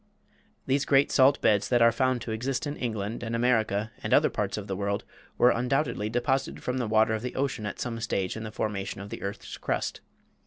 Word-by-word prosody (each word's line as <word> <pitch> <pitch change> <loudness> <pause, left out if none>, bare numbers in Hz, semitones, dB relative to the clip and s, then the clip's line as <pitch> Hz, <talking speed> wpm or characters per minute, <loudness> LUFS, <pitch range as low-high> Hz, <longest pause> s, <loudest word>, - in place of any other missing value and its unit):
These 135 +1 +1
great 140 +1 +4
salt 140 +1 +5
beds 105 -2 +3
that 120 - +4
are 115 0 +6
found 130 +1 +1
to 115 - -5
exist 125 +5 -2
in 145 0 -3
England 110 -3 -3
and 115 0 -3
America 110 -3 +1
and - - +2
other - - +4
parts - - -2
of - - -5
the 95 - -3
world 100 +1 -2 0.3
were 125 - +6
undoubtedly 125 -3 0
deposited 120 +3 -1
from 125 +1 -1
the 120 - -1
water 110 0 +3
of 110 - -2
the 125 +1 -5
ocean 130 -6 -1
at - - -6
some 115 -2 -3
stage 100 -5 -1
in 110 - -5
the 110 -1 -6
formation 100 -3 -3
of 100 +1 -8
the - - -6
earth's 100 +1 -6
crust. - - -2
115 Hz, 220 wpm, -28 LUFS, 105-130 Hz, 0.3 s, are